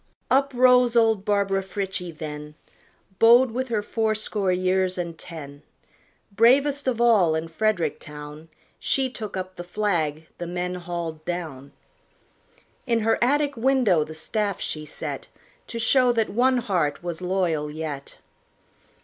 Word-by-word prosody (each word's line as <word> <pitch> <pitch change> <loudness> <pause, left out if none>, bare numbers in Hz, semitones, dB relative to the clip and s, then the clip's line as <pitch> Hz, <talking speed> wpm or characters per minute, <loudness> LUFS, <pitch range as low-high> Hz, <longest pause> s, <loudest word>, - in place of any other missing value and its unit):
Up 275 +1 +3
rose 250 -1 +5
old 225 -4 +3
Barbara 200 -1 +1
Frietchie 190 -1 -4
then, 150 -1 -7 0.6
Bowed 240 +2 +6
with 260 +3 -2
her 215 -3 0
fourscore 215 -3 -1
years 185 0 +1
and 170 -2 -4
ten; 145 -4 -10 0.7
Bravest 275 +5 +4
of 245 -3 0
all 210 -9 +4
in 160 +1 -2
Frederick 165 -4 0
town, 150 +2 -10 0.3
She 265 -2 0
took 215 -5 -6
up 185 0 -6
the 175 - -5
flag 175 -5 -1
the 175 - -4
men 180 +1 -3
hauled 170 -3 -5
down; 155 -6 -5 1.2
In 230 -2 +2
her 225 +2 +2
attic 285 +2 +2
window 235 - +3
the 155 +1 -9
staff 205 +4 -2
she 155 -1 -4
set, - - -5 0.4
To 235 - -6
show 250 +2 +4
that 225 -2 +1
one 255 +4 +3
heart 175 -10 -1
was 175 -1 -4
loyal 180 -5 0
yet. 150 -2 -6
190 Hz, 140 wpm, -24 LUFS, 160-230 Hz, 1.2 s, Bowed